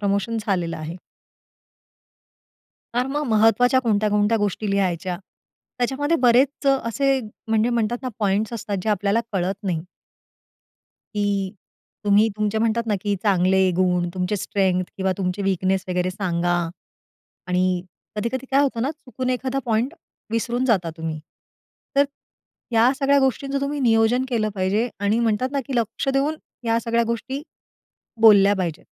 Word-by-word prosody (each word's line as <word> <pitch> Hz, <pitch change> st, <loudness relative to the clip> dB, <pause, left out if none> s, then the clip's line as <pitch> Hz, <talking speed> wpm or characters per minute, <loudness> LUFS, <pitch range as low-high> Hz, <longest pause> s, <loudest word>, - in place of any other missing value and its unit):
Promotion 200 Hz, +3 st, 0 dB
झालेलं 175 Hz, -5 st, -1 dB
आहे. 160 Hz, +2 st, -6 dB, 2.0 s
कारण 250 Hz, +2 st, 0 dB
मग 295 Hz, -, -1 dB
महत्वाच्या 230 Hz, +4 st, +4 dB
कोणत्या 215 Hz, -3 st, +1 dB
कोणत्या 210 Hz, +2 st, +3 dB
गोष्टी 205 Hz, 0 st, -1 dB
लिहायच्या. 185 Hz, -2 st, 0 dB, 0.6 s
त्याच्यामध्ये 275 Hz, +6 st, +1 dB
बरेच 255 Hz, +4 st, +3 dB
असे, 270 Hz, +1 st, +2 dB, 0.3 s
म्हणजे 225 Hz, +2 st, +2 dB
म्हणतात 235 Hz, 0 st, 0 dB
ना, 255 Hz, -, -2 dB
पॉइंट्स 205 Hz, +2 st, 0 dB
असतात 225 Hz, -3 st, -3 dB
जे -, -, -1 dB
आपल्याला 205 Hz, +2 st, +1 dB
कळत 190 Hz, 0 st, 0 dB
नाही. 180 Hz, -4 st, -1 dB, 1.4 s
की 205 Hz, -1 st, 0 dB, 0.8 s
तुम्ही 205 Hz, +2 st, +5 dB
तुमचे 215 Hz, 0 st, 0 dB
म्हणतात 230 Hz, +1 st, +1 dB
ना 215 Hz, -, +1 dB
की 205 Hz, -1 st, 0 dB
चांगले 190 Hz, -1 st, +3 dB
गुण 180 Hz, -1 st, +2 dB
तुमचे 185 Hz, +3 st, -1 dB
स्ट्रेंग्थ 185 Hz, -2 st, 0 dB
किंवा 190 Hz, -1 st, 0 dB
तुमचे 185 Hz, +1 st, -2 dB
वीकनेस 190 Hz, 0 st, 0 dB
वगैरे 180 Hz, 0 st, 0 dB
सांगा 175 Hz, -2 st, -1 dB, 0.9 s
आणि 180 Hz, 0 st, +1 dB, 0.5 s
कधी-कधी 235 Hz, +5 st, -2 dB
काय 275 Hz, +1 st, +4 dB
होतं 245 Hz, -5 st, 0 dB
ना 270 Hz, -, 0 dB
चुकून 255 Hz, -4 st, -5 dB
एखादा 260 Hz, +1 st, -1 dB
पॉइंट 235 Hz, +6 st, 0 dB, 0.4 s
विसरून 235 Hz, +2 st, -1 dB
जाता 190 Hz, -9 st, +2 dB
तुम्ही. 160 Hz, -1 st, -4 dB, 0.8 s
तर 280 Hz, -, +6 dB, 0.7 s
ह्या 230 Hz, +2 st, +5 dB
सगळ्या 280 Hz, 0 st, +4 dB
गोष्टींचं 275 Hz, +1 st, 0 dB
तुम्ही 280 Hz, +1 st, -2 dB
नियोजन 235 Hz, +1 st, +3 dB
केलं 225 Hz, -4 st, 0 dB
पाहिजे 200 Hz, +5 st, 0 dB
आणि 205 Hz, +3 st, +2 dB
म्हणतात 230 Hz, +2 st, +1 dB
ना, 280 Hz, -, 0 dB
की 270 Hz, -, -3 dB
लक्ष 230 Hz, +3 st, -1 dB
देऊन 290 Hz, +3 st, +1 dB, 0.3 s
या 230 Hz, 0 st, +2 dB
सगळ्या 235 Hz, 0 st, +1 dB
गोष्टी 260 Hz, +5 st, -3 dB, 0.8 s
बोलल्या 205 Hz, -3 st, +7 dB
पाहिजेत 170 Hz, -4 st, -3 dB
220 Hz, 140 wpm, -23 LUFS, 195-250 Hz, 2.0 s, बोलल्या